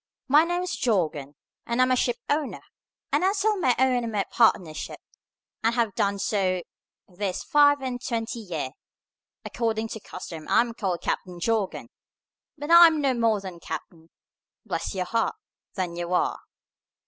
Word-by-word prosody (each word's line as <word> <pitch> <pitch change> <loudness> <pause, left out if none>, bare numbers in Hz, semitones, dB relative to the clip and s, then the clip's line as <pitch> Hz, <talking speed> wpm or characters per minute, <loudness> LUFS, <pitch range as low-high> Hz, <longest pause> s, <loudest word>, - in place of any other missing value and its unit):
My 295 +4 +6
name's 355 +1 -2
Jorgan, 155 - -1 0.3
and 235 +1 -1
I'm 255 0 +4
a - - +5
ship 245 -1 +1
owner, 290 -1 -1 0.5
and - - +2
I 380 +1 +3
sail 425 +1 +1
my 255 -8 +3
own 255 -1 +3
and 230 - -3
my 205 -2 0
partners' 180 -9 +3
ships, - - -7 0.6
and 230 +1 +2
have 230 -4 +1
done 200 +1 0
so 185 -3 0 0.4
this 185 0 -4
five 290 -2 +4
and 250 -2 -4
twenty 230 -1 -3
year. 165 -11 -4 0.7
According 225 -1 -1
to 220 - -6
custom 170 -5 -9
I - - +5
am 235 -1 -3
called 190 -6 -3
Captain 180 -2 -3
Jorgan, 215 0 -1 0.7
but 295 +3 -4
I 340 0 +10
am 320 -2 +1
no 275 -3 +2
more 230 -3 +2
a 180 -2 -7
captain, 160 0 -8 0.6
bless - - -3
your 185 -1 -1
heart, 230 - 0 0.4
than 180 -4 -2
you 175 0 -4
are." - - +1
225 Hz, 165 wpm, -26 LUFS, 185-260 Hz, 0.7 s, I